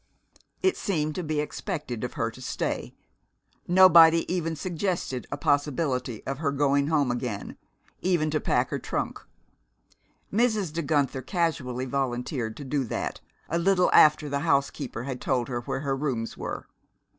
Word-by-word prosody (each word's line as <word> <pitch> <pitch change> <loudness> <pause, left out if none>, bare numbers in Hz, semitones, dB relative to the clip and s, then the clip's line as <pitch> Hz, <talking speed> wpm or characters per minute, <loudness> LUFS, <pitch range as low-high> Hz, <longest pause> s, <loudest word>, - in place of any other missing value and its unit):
It 375 - +3
seemed 155 -6 -1
to 180 - -4
be 155 -1 -1
expected 150 - -4
of 125 - -3
her 115 -3 -1
to 130 - -13
stay. - - -3 0.7
Nobody 170 -3 +7
even 165 -3 -1
suggested 175 -6 -3
a - - -2
possibility 140 -5 0
of 135 0 -3
her 145 -3 0
going 140 0 +2
home 145 -5 +2
again, 120 -4 -4 0.5
even 170 -4 +1
to 155 - +1
pack - - +1
her - - -1
trunk. - - -3 1.1
Mrs. 215 -7 +1
De 170 - -1
Guenther 145 -3 0
casually 130 -6 -1
volunteered 125 -3 -2
to 145 - -7
do 140 +1 0
that, - - -4 0.3
a 170 - 0
little 180 +1 +3
after 150 0 +6
the 140 0 -1
housekeeper 140 -5 0
had 130 -1 -5
told 125 -2 0
her 120 -1 -2
where 125 - -3
her 140 -2 -1
rooms 130 -5 -2
were. - - -5
145 Hz, 155 wpm, -27 LUFS, 130-165 Hz, 1.1 s, Nobody